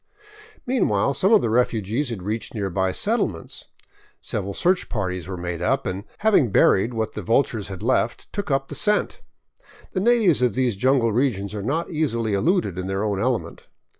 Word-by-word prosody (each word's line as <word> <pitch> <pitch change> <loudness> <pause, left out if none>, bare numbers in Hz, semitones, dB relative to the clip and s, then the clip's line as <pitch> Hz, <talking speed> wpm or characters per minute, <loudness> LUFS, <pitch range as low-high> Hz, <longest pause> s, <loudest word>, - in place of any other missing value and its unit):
Meanwhile 140 - +1
some 185 - +2
of 220 - +6
the - - +1
refugees 115 +2 0
had 105 -6 -5
reached 110 +3 -4
nearby 95 -2 -1
settlements. 200 - -2 0.5
Several 100 -1 -4
search 180 +1 +1
parties 95 -5 -3
were 95 -1 -5
made 85 -1 -4
up 135 +9 0
and, 95 +2 -4
having 205 - +3
buried 110 +4 +3
what 110 -1 -2
the 105 - -5
vultures 115 0 0
had 95 -2 -8
left, - - -1
took 200 -3 -4
up 135 -1 0
the - - -5
scent. 210 0 +1 0.7
The 185 - 0
natives 215 - +3
of 125 -5 +2
these 125 -4 +1
jungle 125 +1 +2
regions 105 -5 0
are 105 - -4
not 150 +11 -2
easily 115 -9 -1
eluded 100 - +1
in 95 - -4
their 95 +1 -2
own 100 -3 -1
element. 110 -7 -2
115 Hz, 175 wpm, -23 LUFS, 95-140 Hz, 0.7 s, of